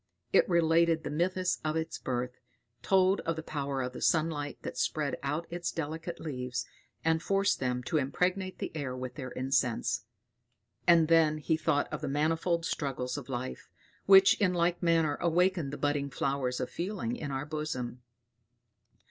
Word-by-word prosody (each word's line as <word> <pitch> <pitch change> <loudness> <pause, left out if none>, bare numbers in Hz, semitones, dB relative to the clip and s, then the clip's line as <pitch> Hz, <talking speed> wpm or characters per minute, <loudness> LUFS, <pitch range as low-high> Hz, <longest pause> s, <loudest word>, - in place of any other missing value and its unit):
It - - +5
related 165 -1 +3
the - - -4
mythus 180 +3 0
of 155 0 -1
its 160 0 -3
birth, 125 -1 -3 0.4
told 190 0 +3
of 165 - -2
the 160 - -5
power 140 -3 -2
of 125 0 -4
the - - -8
sun 160 0 +3
light 145 -2 -4
that - - -5
spread 150 -2 0
out 150 +4 -2
its 175 0 -2
delicate 165 +2 -4
leaves, 125 -5 -4 0.4
and 160 0 +2
forced 195 +2 +1
them 125 -1 -1
to 155 - 0
impregnate 180 +7 0
the - - -5
air 130 -4 -3
with 130 -1 -5
their 130 -4 -6
incense 125 -3 0 0.8
and 170 -2 +6
then 160 -2 +4
he 155 +2 0
thought 155 -2 +1
of - - -3
the 150 - -3
manifold 165 +4 +1
struggles 125 -5 -2
of 140 -2 -7
life, 130 0 -5 0.4
which 195 0 +8
in 180 -3 +3
like 170 0 +1
manner 165 -4 +2
awaken 175 -2 +2
the 145 - -5
budding 145 -1 0
flowers 135 -1 -1
of 125 - -3
feeling 210 +6 -3
in 155 -11 -5
our 135 +1 -3
bosom. 145 -5 -4
155 Hz, 170 wpm, -30 LUFS, 135-170 Hz, 0.8 s, which